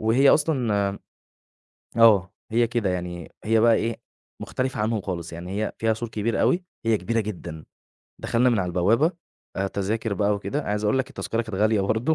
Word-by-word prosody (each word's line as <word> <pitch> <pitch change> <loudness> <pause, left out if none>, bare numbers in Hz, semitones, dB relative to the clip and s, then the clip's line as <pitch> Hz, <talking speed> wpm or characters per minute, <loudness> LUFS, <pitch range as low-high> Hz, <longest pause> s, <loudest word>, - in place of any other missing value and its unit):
وهي 120 +6 +4
أصلًا 120 -10 +2
آمم، 100 - -8 1.0
آه، 100 -6 +6 0.2
هي 120 +1 +3
كده 115 -4 -1
يعني 90 -1 -5
هي 110 +1 +3
بقى 115 0 +5
إيه، 115 +1 -1 0.4
مختلفة 130 -1 -2
عنهم 110 0 0
خالص، 85 -4 -5
يعني 90 +5 -4
هي - - -4
فيها 110 0 +1
سور 115 +1 -5
كبير 110 +1 -1
أوي 180 +1 +2 0.2
هي 115 -1 +3
كبيرة 115 +5 -1
جدًا، 85 -7 -6 0.6
دخلنا 120 +2 +2
من 115 - +2
على 90 - 0
البوابة، 110 - +2 0.6
تَذَاكر 105 +2 -1
بقى 105 0 +1
وكده، 140 +8 -3
عايز 105 +1 -2
أقول 105 +5 +2
لك 130 - -1
التذكرة 115 +1 -3
كانت 110 -3 -7
غالية 110 0 +3
برضه، 110 +10 +1
110 Hz, 180 wpm, -24 LUFS, 100-115 Hz, 1.0 s, آه